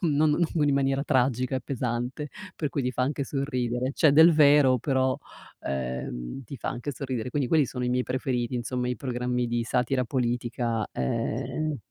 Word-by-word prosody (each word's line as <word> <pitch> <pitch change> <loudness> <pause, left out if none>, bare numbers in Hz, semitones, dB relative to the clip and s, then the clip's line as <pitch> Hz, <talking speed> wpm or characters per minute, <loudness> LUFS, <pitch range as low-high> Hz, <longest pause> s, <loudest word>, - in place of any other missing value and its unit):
non 155 -1 +3
non 155 -1 +1
in 140 - +3
maniera 135 0 +1
tragica 130 -1 +1
e - - -2
pesante, 125 +3 -3 0.3
per 150 - -1
cui 140 -1 -2
ti 125 - 0
fa 125 - -1
anche 140 +1 -1
sorridere. 130 -2 -2
C'è 155 -1 +4
del 160 +3 +8
vero, 145 -4 +6
però, 130 0 +1 0.4
ehm, 65 - -4
ti 135 - -8
fa - - -5
anche 125 +4 -4
sorridere. 125 -2 -4
Quindi 140 -2 0
quelli 155 -4 +4
sono 125 0 -4
i - - 0
miei 125 0 +1
preferiti, 125 -2 -2
insomma, 125 +1 -2
i 125 - -1
programmi 125 -1 -1
di 120 0 -1
satira 125 +2 +1
politica, 120 -2 -1
ehm 150 - -2
130 Hz, 175 wpm, -27 LUFS, 120-140 Hz, 0.4 s, del